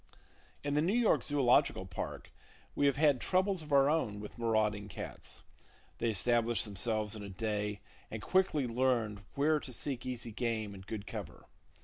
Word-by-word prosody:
In 145 0 -1
the 150 - +3
New 185 +7 +2
York 240 -3 +3
Zoological 140 -4 +3
Park, - - -6 0.4
we 145 - +3
have 140 - +3
had 145 -3 +3
troubles 190 -1 +2
of 150 -1 -10
our 140 -1 +6
own 145 -10 +1
with 105 +3 -9
marauding 110 -3 +1
cats. 100 - -7 0.6
They 115 - +1
establish 115 +1 +2
themselves 105 +1 0
in 110 - -7
a 100 - -7
day, 105 +1 -2 0.3
and 110 - -5
quickly 170 - +2
learn 115 -4 0
where 150 +2 +3
to 135 - -8
seek 130 0 -2
easy 120 -2 -3
game 110 -2 -2
and 95 -1 -11
good 105 -2 -5
cover. - - -7
120 Hz, 165 wpm, -33 LUFS, 105-145 Hz, 0.6 s, our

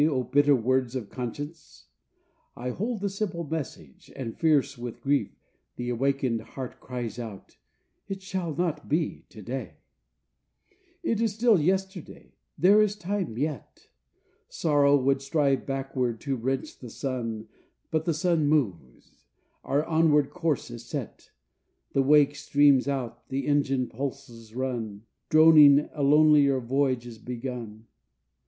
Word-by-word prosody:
O 140 -5 +2
bitter 145 +3 +4
words 130 +1 0
of 120 -6 -5
conscience! 130 - -7 0.7
I 125 +1 -4
hold 220 - -3
the 200 - 0
simple 190 -4 -3
message, 145 - -7
And 115 -4 -5
fierce 145 -3 +2
with 120 -2 -7
grief 140 -7 +1 0.5
the 120 - -4
awakened 130 -2 0
heart 125 +3 -8
cries 120 -3 -6
out: 110 -5 -9 0.5
'It 195 -1 -5
shall 185 -5 -3
not 175 -2 -2
be 155 +2 -1
to 105 - -12
day; 130 +5 -5 1.3
It 230 -8 0
is 220 -3 0
still 225 -3 +4
yesterday; 190 +1 -3 0.2
there 200 +4 +6
is 210 -1 +1
time 190 - -3
yet!' 145 -2 -5 0.6
Sorrow 145 -2 +3
would 135 0 +1
strive 140 -1 0
backward 135 -4 -2
to 140 -2 -2
wrench 130 +2 -3
the 125 - -9
sun, 115 -4 -4 0.4
But 160 -1 0
the 170 - +1
sun 165 -2 +1
moves. 95 - -2 0.4
Our 145 +3 0
onward 155 -3 +3
course 160 -4 -2
is 120 -1 -8
set, - - -7 0.6
The 135 - +3
wake 145 +1 +5
streams 145 -2 +3
out, 125 -4 -4
the 135 0 -2
engine 140 -3 +1
pulses 120 -3 -7
run 115 -5 -4 0.3
Droning, 155 -3 +7
a 150 - -4
lonelier 145 -1 +5
voyage 130 0 0
is 115 -2 -10
begun. 120 -3 -6
140 Hz, 135 wpm, -27 LUFS, 125-155 Hz, 1.3 s, Droning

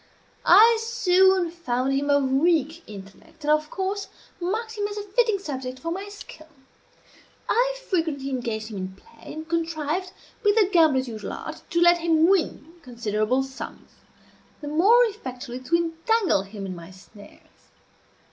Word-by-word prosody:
I 455 +1 +7
soon 380 -6 +3
found 270 -6 -1
him 280 +1 0
of 285 -2 +2
weak 320 +2 +2
intellect, 210 +10 -13
and 300 - +2
of 305 0 +2
course 390 +1 -3 0.3
marked 445 +6 -3
him 410 -1 -1
as 415 0 -7
a 415 - -3
fitting 435 +1 +1
subject 260 -8 -6
for 330 +5 -5
my 390 +3 -4
skill. 320 -6 -12 1.0
I - - +1
frequently 315 -7 -1
engaged 230 -4 -3
him 210 - -7
in 190 0 -6
play, 460 - -15
and 315 +1 -7
contrived, 335 +2 -2 0.3
with 410 0 +4
the 430 -4 +4
gambler's 300 -7 +4
usual 220 -3 -6
art, - - -7
to 340 - 0
let 345 0 +5
him 325 -1 +3
win 335 -4 0
considerable 235 0 -1
sums, 265 0 -9 0.7
the 295 - -8
more 395 +11 +5
effectually 255 - -6
to 260 +6 0
entangle 340 - +1
him 195 0 -8
in 185 -1 -5
my 170 0 -11
snares. 200 +2 -17
320 Hz, 155 wpm, -24 LUFS, 255-380 Hz, 1.0 s, I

